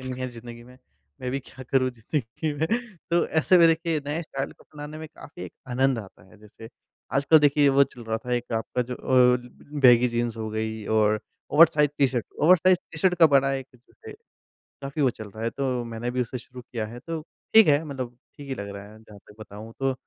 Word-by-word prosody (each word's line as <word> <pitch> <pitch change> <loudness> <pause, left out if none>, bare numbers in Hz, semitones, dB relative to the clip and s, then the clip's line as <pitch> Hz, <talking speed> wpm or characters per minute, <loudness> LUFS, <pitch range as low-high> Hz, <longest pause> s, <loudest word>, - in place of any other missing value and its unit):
नहीं 130 0 -5
है 130 - -2
ज़िन्दगी 120 -1 -11
में। 125 +1 -16 0.4
मैं 125 -1 -3
भी 135 - -1
क्या 130 0 -13
करूँ 130 -1 +2
ज़िंदगी 125 +5 -4
में? 150 +2 -1 0.4
तो 170 0 +2
ऐसे 160 +3 +3
भी 170 - +7
देखिए 165 -1 +1
नए 155 +4 -2
स्टाइल 135 -3 -5
को - - -22
अपनाने 150 +1 -8
में 160 - -7
काफ़ी 160 +2 -12
एक - - -10 0.2
आनंद 130 0 +1
आता 95 -4 -11
है। 110 - -19
जैसे 110 +1 -13 0.5
आजकल 140 +3 +5
देखिए 145 -1 +4
वो 140 0 +5
चल 120 -3 -13
रहा 110 0 -2
था 125 - -2
एक 120 0 -4
आपका 115 +2 -2
जो 125 +1 -6
ओ 125 -1 +4 0.4
बैगी 125 -2 +6
जीन्स 120 -1 -2
हो 110 -1 -4
गई 110 0 -4
और 110 -1 +2 0.3
ओवरसाइज़ 150 -1 +5
टी-शर्ट 130 -4 +1 0.2
ओवरसाइज़ 180 +2 +5
टी-शर्ट 180 +4 +2
का 165 - +8
बड़ा 135 -1 +3
एक 135 -1 -4
जो 125 0 -24 0.2
है, - - -7 0.7
काफ़ी 140 +2 -3
वो 130 - +4
चल 110 -2 -10
रहा 110 +3 -9
है 115 - 0
तो 130 -3 -2
मैंने 115 +1 -4
भी 125 +1 -2
उसे 125 +2 -6
शुरू 125 +1 -12
किया 115 -2 -5
है, 115 +3 -9
तो 165 +3 -5 0.3
ठीक 220 -1 +9
है, 145 +1 +4
मतलब 130 -5 -6 0.2
ठीक 145 -1 -10
ही 135 - -2
लग 100 -4 -6
रहा 100 +1 -10
है। 110 - -15
जहाँ 105 -2 -15
तक - - -15
बताऊँ 105 +2 -10
तो 135 0 +1
130 Hz, 220 wpm, -25 LUFS, 115-145 Hz, 0.7 s, ठीक